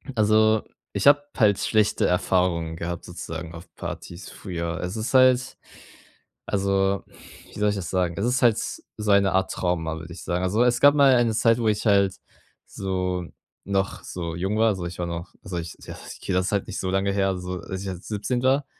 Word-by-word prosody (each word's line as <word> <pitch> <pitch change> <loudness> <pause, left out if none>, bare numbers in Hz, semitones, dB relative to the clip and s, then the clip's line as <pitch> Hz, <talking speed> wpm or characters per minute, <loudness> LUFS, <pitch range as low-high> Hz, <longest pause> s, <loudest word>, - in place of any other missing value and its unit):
also, 110 0 +4 0.3
ich - - +1
habe 145 0 +7
halt 105 -5 +4
schlechte 110 -1 +2
Erfahrungen 90 -2 +1
gehabt 85 0 -5
sozusagen 85 -1 -7
auf 85 +1 -12
Partys 85 +1 -7
früher. 85 -3 -4
Also, 90 +5 -4
es 110 - -2
ist - - -5
halt 130 0 +4 0.9
also, 100 0 +1 0.5
wie - - -8
soll 105 - +3
ich 105 - -1
das 90 -4 -4
sagen? 90 -2 0
Es 100 - 0
ist 125 +1 +1
halt 115 -3 +5
so 105 -1 -4
eine 100 -1 +4
Art 95 0 +1
Trauma, 80 -3 -1
würde 85 +1 -9
ich 90 - -10
sagen. 90 +1 -1
Also, 105 +6 +2
es 120 -1 +2
gab 145 +1 +7
mal 140 -2 +6
eine 120 -2 +2
Zeit, 115 +1 +3
wo 115 - 0
ich 105 +1 0
halt 100 -2 +3 0.5
so 90 -2 -3 0.4
noch 100 0 -1
so 85 -2 -5
jung 95 +5 -1
war, 110 +1 +4
also, 95 -4 -2
ich 85 - -8
war 85 - -1
noch 85 +1 -6
also, 90 -1 -5
ich 85 0 -7
ja, - - -8 0.2
okay - - -4
das 90 +1 +1
halt 100 -2 0
nicht - - -5
so 95 - -2
lange 95 +1 +1
her, 95 -1 +1
so 90 0 -5
als 95 +3 -6
ich 100 - -5
halt 90 -1 -7
17 110 +4 -2
war 135 +2 +3
95 Hz, 205 wpm, -24 LUFS, 90-110 Hz, 0.9 s, habe